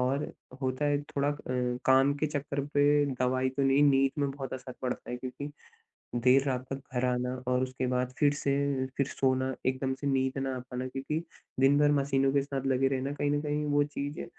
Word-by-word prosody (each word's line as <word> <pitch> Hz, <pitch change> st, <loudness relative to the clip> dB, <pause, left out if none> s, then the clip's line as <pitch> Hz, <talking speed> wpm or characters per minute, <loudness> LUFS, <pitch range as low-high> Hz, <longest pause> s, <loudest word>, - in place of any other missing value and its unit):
और 135 Hz, +3 st, 0 dB, 0.3 s
होता 130 Hz, +2 st, -1 dB
है 145 Hz, 0 st, +2 dB
थोड़ा 145 Hz, -1 st, -1 dB
अ, -, -, +2 dB, 0.5 s
काम 135 Hz, +2 st, +5 dB
के 155 Hz, -, +2 dB
चक्कर 145 Hz, -1 st, -2 dB
पे 145 Hz, 0 st, +4 dB
दवाई 130 Hz, +1 st, +1 dB
तो 135 Hz, +1 st, -2 dB
नहीं, 135 Hz, +1 st, +4 dB
नींद 135 Hz, -2 st, +4 dB
में 140 Hz, -1 st, +1 dB
बहुत 135 Hz, -1 st, -6 dB
असर 130 Hz, 0 st, -7 dB
पड़ता 125 Hz, -1 st, -3 dB
है, 125 Hz, -, -2 dB
क्योंकि 130 Hz, +3 st, -6 dB, 0.7 s
देर 125 Hz, +3 st, +4 dB
रात 130 Hz, -1 st, -1 dB
तक 135 Hz, 0 st, -3 dB
घर 125 Hz, +1 st, +1 dB
आना 125 Hz, 0 st, 0 dB, 0.2 s
और 125 Hz, 0 st, +2 dB
उसके 130 Hz, 0 st, -2 dB
बाद 125 Hz, 0 st, -1 dB
फिर 145 Hz, -1 st, +4 dB
से 140 Hz, -1 st, 0 dB, 0.4 s
फिर 140 Hz, -, +1 dB
सोना 130 Hz, -1 st, 0 dB
एकदम 130 Hz, 0 st, 0 dB
से 145 Hz, -, -1 dB
नींद 130 Hz, -1 st, +1 dB
ना 135 Hz, -1 st, -2 dB
आ -, -, -4 dB
पाना, 125 Hz, 0 st, -5 dB
क्योंकि 135 Hz, +4 st, -3 dB, 0.4 s
दिन 135 Hz, +2 st, +5 dB
भर 145 Hz, 0 st, +5 dB
मशीनों 135 Hz, -1 st, +2 dB
के 140 Hz, -, +4 dB
साथ 135 Hz, -1 st, -4 dB
लगे 135 Hz, 0 st, +3 dB
रहना 135 Hz, +1 st, -1 dB
कहीं 145 Hz, 0 st, 0 dB
न 145 Hz, 0 st, +1 dB
कहीं 150 Hz, 0 st, -1 dB
वो 145 Hz, 0 st, +4 dB
चीजें 145 Hz, 0 st, -5 dB
135 Hz, 210 wpm, -30 LUFS, 130-145 Hz, 0.7 s, काम